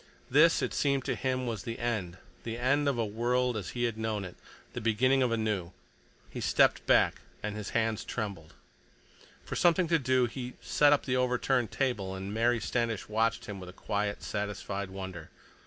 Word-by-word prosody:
This, 155 +5 +5
it - - -1
seemed 140 -2 +1
to 135 - 0
him, 130 +1 -1
was 115 -5 -3
the 115 +3 -5
end, 110 -7 -2 0.2
the 115 0 -5
end 140 +4 +2
of 135 - -1
a 115 - +1
world 120 +3 0
as 100 -5 -4
he 120 - 0
had 115 -2 -1
known 110 -3 -2
it, 90 - -9 0.4
the 120 - -4
beginning 130 +5 +3
of 125 -2 +2
a 115 - +1
new. 100 -6 -2 0.5
He - - -7
stepped - - +3
back, - - +4 0.2
and 105 0 -3
his 105 -2 -5
hands 110 -1 0
trembled. 95 -7 -5 0.9
For - - -5
something 175 0 +3
to 165 -1 +4
do 130 -1 +3
he 125 +1 -5
set 145 -1 +3
up 145 - +3
the 125 -1 +1
overturned 125 -1 +1
table, 110 -8 -1
and 95 +2 -5
Mary 120 +2 +2
Standish 115 -1 -1
watched 115 +1 +1
him 100 -2 -6
with 90 -1 -8
a - - -11
quiet, 105 +1 -2
satisfied 100 -1 -3
wonder. 95 -4 -7
115 Hz, 190 wpm, -30 LUFS, 105-125 Hz, 0.9 s, This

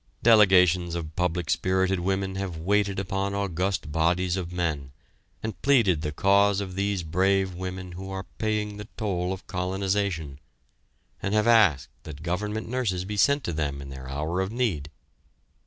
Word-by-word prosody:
Delegations 90 -6 +5
of 80 -2 -5
public 90 -1 -1
spirited 95 0 +1
women 95 +1 -1
have 95 -3 -4
waited 100 +3 +1
upon 95 +1 -2
august 95 -4 -1
bodies 85 +3 +1
of 90 -2 -4
men, 75 -6 -2 0.5
and 110 -2 -5
pleaded 115 - +3
the 75 - -2
cause 100 +4 +3
of 95 -2 -5
these 100 -1 -1
brave 95 +3 +1
women 90 0 -6
who 95 +2 -7
are 95 -1 -5
paying 105 -1 -1
the 105 0 -8
toll 95 -5 -1
of 95 0 -6
colonization, 95 -5 -2 0.8
and 100 +2 -1
have 105 0 +3
asked 105 - +4
that 75 +1 -10
Government 105 +5 -2
nurses 110 -7 -1
be 105 +2 -4
sent 140 +7 +3
to 85 - -3
them 70 -3 -2
in 70 0 -8
their 65 -1 -8
hour 80 +6 -2
of 95 +1 -2
need. 105 - -1
95 Hz, 160 wpm, -26 LUFS, 85-100 Hz, 0.8 s, Delegations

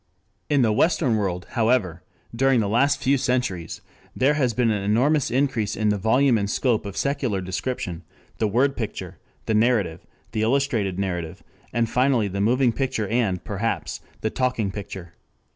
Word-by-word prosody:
In 145 -3 +3
the 110 - +3
western 140 0 +2
world, 90 -4 -2
however, 110 -8 +1 0.3
during 135 0 +3
the 105 - 0
last 140 +7 +2
few 135 +1 +3
centuries 120 -11 -2 0.3
there 135 +3 +3
has 135 -5 +1
been 120 -2 +2
an 105 -2 -1
enormous 125 +9 +2
increase 120 -5 0
in 110 -1 +1
the 105 - +1
volume 120 +3 +3
and 100 0 -2
scope 115 -2 0
of 100 - -7
secular 130 -8 0
description, 95 -2 -4 0.4
the 110 - +2
word 130 +6 +2
picture, 110 -3 -5 0.3
the 110 - 0
narrative, 110 -7 +1 0.3
the 110 - -2
illustrated 115 -6 +1
narrative, 90 -2 -3 0.3
and 115 -1 +1
finally 125 -2 +2
the 100 +1 -3
moving 120 +3 +3
picture 120 -5 -1
and, 110 -6 0
perhaps, 105 +3 -3 0.2
the 110 - -1
talking 125 -6 0
picture. 95 -4 -8
115 Hz, 160 wpm, -24 LUFS, 100-130 Hz, 0.4 s, In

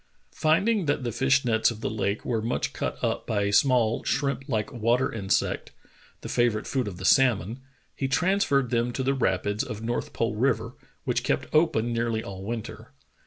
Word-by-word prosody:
Finding 180 +5 +2
that 145 -2 0
the 120 - -2
fish 130 +3 +2
nets 110 -2 +3
of 115 -2 -7
the - - -1
lake 105 -1 -2
were 115 -3 0
much 115 +3 -2
cut - - -3
up - - -1
by 105 -2 0
a 100 0 -1
small, 120 -2 +3
shrimp 140 0 -1
like 110 0 -1
water 120 +2 +1
insect, 100 -4 -1 0.5
the - - -7
favorite 120 -3 +1
food 130 -5 -1
of 95 -3 -6
the 95 - -6
salmon, 120 -2 +3 0.4
he 135 - -2
transferred 140 -4 +1
them 120 0 +1
to 130 - -2
the 135 +1 +1
rapids 105 -4 0
of 105 +1 -7
North 120 +1 -2
Pole 115 -1 -1
River, 115 -1 0 0.3
which - - -1
kept - - 0
open 120 -7 +2
nearly 115 -1 -1
all 95 -1 -8
winter. 115 +1 -6
120 Hz, 185 wpm, -26 LUFS, 110-135 Hz, 0.5 s, nets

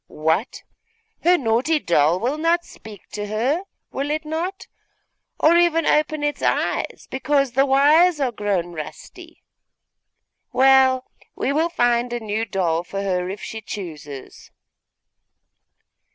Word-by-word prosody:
What! 160 +9 -1 0.6
her 355 +1 +5
naughty 255 +5 +1
doll 170 - +2
will 260 +8 -2
not 335 +2 +1
speak 210 -4 -13
to 205 0 -5
her, 245 - 0 0.3
will 280 +2 -3
it 310 +1 -2
not? 355 +5 -4 0.7
or 320 +2 +5
even 340 -2 +3
open 305 0 +1
its 295 0 -2
eyes, - - -1
because 275 0 +1
the 270 +3 +2
wires 300 +5 +4
are 265 -3 0
grown 195 -5 -2
rusty? 155 -2 -10 1.1
Well, 265 -1 +4 0.3
we 275 - -1
will 320 +3 +1
find 240 -5 +1
a 240 - -2
new 220 0 -2
doll 175 -5 -1
for 195 +2 -5
her, 180 -2 -1
if 200 +2 -7
she 220 - -6
chooses. 155 -10 -9
255 Hz, 130 wpm, -22 LUFS, 200-305 Hz, 1.1 s, her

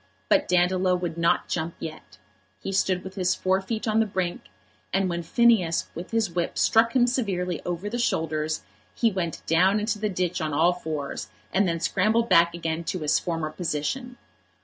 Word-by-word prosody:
But - - +3
Dandolo 180 +1 +3
would 175 -2 -3
not 170 0 +1
jump 165 0 -3
yet. 155 -1 -8 0.4
He - - -5
stood 185 -1 +1
with 190 - -8
his 185 -2 +1
fore 190 +1 +1
feet 220 +3 -4
on 215 0 +2
the 225 - +2
brink, 185 -3 -3 0.5
and 195 0 +1
when 170 -1 -2
Phineas 185 -2 +2
with 175 +2 -7
his 225 -5 0
whip 170 0 -2
struck 230 +2 +3
him 245 -2 +5
severely 190 - -1
over 180 +3 -3
the 240 +3 -3
shoulders, 155 - -1 0.3
he 230 -2 +2
went 175 -4 -3
down 185 +5 +3
into 210 0 -1
the 215 0 0
ditch 180 -2 -1
on 155 -1 -2
all 170 +4 +4
fours, 155 -5 -5 0.3
and 195 +1 +3
then 165 -1 -1
scrambled 225 +7 +1
back 170 0 +5
again 165 -1 -3
to 185 - -3
his 150 0 +2
former 165 -3 -3
position. 185 - -3
180 Hz, 185 wpm, -25 LUFS, 165-205 Hz, 0.5 s, him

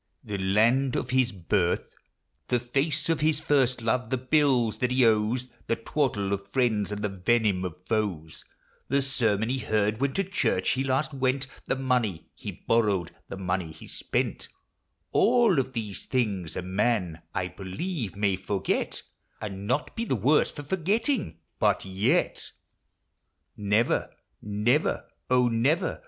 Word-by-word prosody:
The 100 -1 -4
land 115 +8 +3
of 125 - -2
his 130 -1 +3
birth; 90 -1 0 0.5
The 125 - +2
face 140 +5 0
of 165 -1 +1
his 155 -1 +2
first 130 -5 +2
love; 125 +1 0
the 130 - +1
bills 130 -3 +2
that 125 - +1
he 125 -1 +4
owes; 115 +3 +2 0.2
The 115 - +2
twaddle 115 -5 -1
of 100 0 -4
friends, 110 -5 +1
and 105 0 -3 0.2
venom 105 -5 +3
of 90 0 -6
foes; 95 -8 -2 0.4
The 140 +1 +2
sermon 115 -5 0
he 130 +1 0
heard 110 -1 0
when 140 -1 +1
to 195 - +1
church 130 - +1
he 130 - 0
last 135 +1 0
went; 135 0 0 0.2
The - - +1
money 125 -10 0
he - - -7
borrowed, 105 -7 +1 0.2
the - - -6
money 90 -3 -2
he - - -12
spent; - - -2 0.6
All 235 - +4
of 130 0 -2
these 110 -5 -5
things 100 -10 -1
a - - -3
man, 95 -3 0
I 95 -2 0
believe, 105 - -4
may 100 -1 +1
forget, 95 0 -2 0.4
And 100 -1 -6
not 125 +6 -1
be 230 - -1
the 225 - 0
worse 130 +8 +3
for 145 - -8
forgetting; 195 - 0 0.2
but - - +2
yet 95 +1 0 1.1
Never, 105 +3 +1 0.3
never, 105 +8 +1 0.2
oh, 125 -1 +4
never 120 +8 +1
115 Hz, 150 wpm, -27 LUFS, 100-135 Hz, 1.1 s, he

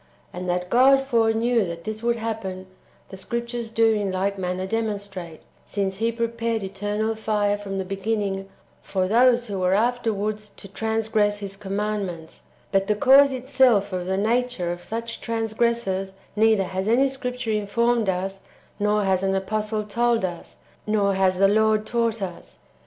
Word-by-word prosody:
And 180 0 -5
that 180 +1 -2
God 265 +3 +6
foreknew 230 -2 +2
that 170 -1 -6
this 215 0 -5
w^ould 235 0 +1
happen, 220 -5 -4 0.4
the 190 - -9
Scriptures 235 +3 -4
do 225 0 +3
in 205 -3 -1
like 195 +2 -1
manner 185 -1 -3
demonstrate, 200 -6 -4 0.2
since 195 -2 -2
He 230 +2 +1
pre 230 0 -1
pared 230 -2 -2
eternal 205 +3 -2
fire 210 -2 0
from 200 -1 -5
the 190 - -2
beginning 195 0 -2 0.3
for 185 -2 -1
those 240 +3 +4
who 200 -4 -4
were 185 +1 +2
[afterwards] 215 -2 -1
to - - -11
transgress 220 0 0
[His 200 -1 -7
commandments]; 195 -4 -4 0.3
but 195 -1 +2
the 210 - +2
cause 275 +4 +6
itself 250 -6 +2
of 180 -1 -3
the 190 0 0
nature 225 -4 0
of 175 0 -6
such 230 +1 -5
transgressors 225 -4 -1 0.2
neither 220 -2 +4
has 190 +1 -3
any 250 +5 +4
Scripture 250 -3 -3
informed 220 +1 +1
us, 190 +1 -2 0.4
nor 210 0 +2
has 190 -1 +1
an 195 0 +1
apostle 215 +2 -1
told 230 0 +1
us, 175 -2 -7 0.3
nor 205 -2 +2
has 190 -1 +2
the 195 +1 +5
Lord 215 +1 +3
taught 230 -2 0
us. 175 -2 -8
210 Hz, 160 wpm, -24 LUFS, 195-230 Hz, 0.4 s, God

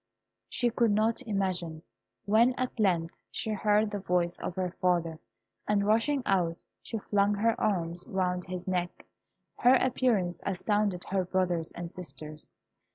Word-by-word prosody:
She 240 -2 +1
could 235 0 +2
not 215 +3 +2
imagine; 180 -6 -1 0.4
when 230 +5 +4
at 255 -2 -3
length 175 -5 +2 0.2
she 220 - -3
heard 210 0 +2
the 205 - -3
voice 180 -2 0
of 180 - -4
her 185 -2 -1
father, 170 -3 +1 0.5
and 205 -1 +2
rushing 230 +6 +2
out, 175 -4 0 0.2
she 225 - -5
flung 205 0 +1
her 225 +3 +2
arms 175 -3 0
round 180 -1 -1
his 185 0 -6
neck. 180 -1 -2 0.5
Her 250 +2 +6
appearance 240 -8 +1
astounded 200 0 0
her 190 -1 0
brothers 180 -3 0
and 175 0 -5
sisters. 155 -3 -9
190 Hz, 145 wpm, -29 LUFS, 175-215 Hz, 0.5 s, Her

